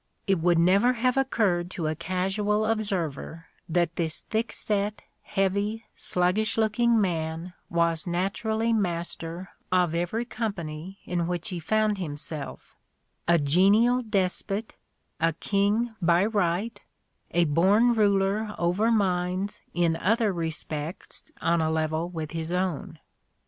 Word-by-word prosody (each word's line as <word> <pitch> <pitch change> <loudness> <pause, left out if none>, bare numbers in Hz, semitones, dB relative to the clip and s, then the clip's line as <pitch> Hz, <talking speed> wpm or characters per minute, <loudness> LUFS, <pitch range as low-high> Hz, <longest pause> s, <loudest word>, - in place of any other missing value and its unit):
It 195 -3 +2
would 170 +1 +3
never 195 +9 +4
have 250 +1 +1
occurred 210 -10 +1
to 180 -4 -4
a 155 - +1
casual 195 +6 0
observer 180 -7 -2 0.2
that 170 0 +1
this 160 -2 -1
thickset, 210 -2 -1 0.2
heavy, 200 +3 -1
slug 180 +2 +1
gish 220 0 0
looking 225 +1 +3
man 165 -2 -2 0.2
was 170 +1 +1
naturally 220 +6 0
master 175 -2 -3 0.2
of 180 -3 +3
every 175 +8 -1
company 190 -6 -5
in 175 -2 -1
which 175 +3 -2
he 180 -3 -4
found 215 +4 +1
himself: 150 -3 -6 0.5
a 170 0 +5
genial 200 - +4
despot," 200 0 -1 0.4
a 165 0 +2
king 205 +7 0
by 170 +2 +4
right, 205 +1 0 0.5
a 175 0 +3
born 195 +10 +4
ruler 205 0 +2
over 180 +6 +2
minds 185 -2 0
in 170 -1 +1
other 215 +3 +2
respects 160 -1 -5
on 170 0 +2
a 160 - +1
level 160 +1 -1
with 160 -3 -5
his 165 0 -4
own. 180 -3 -2
185 Hz, 125 wpm, -27 LUFS, 170-215 Hz, 0.5 s, a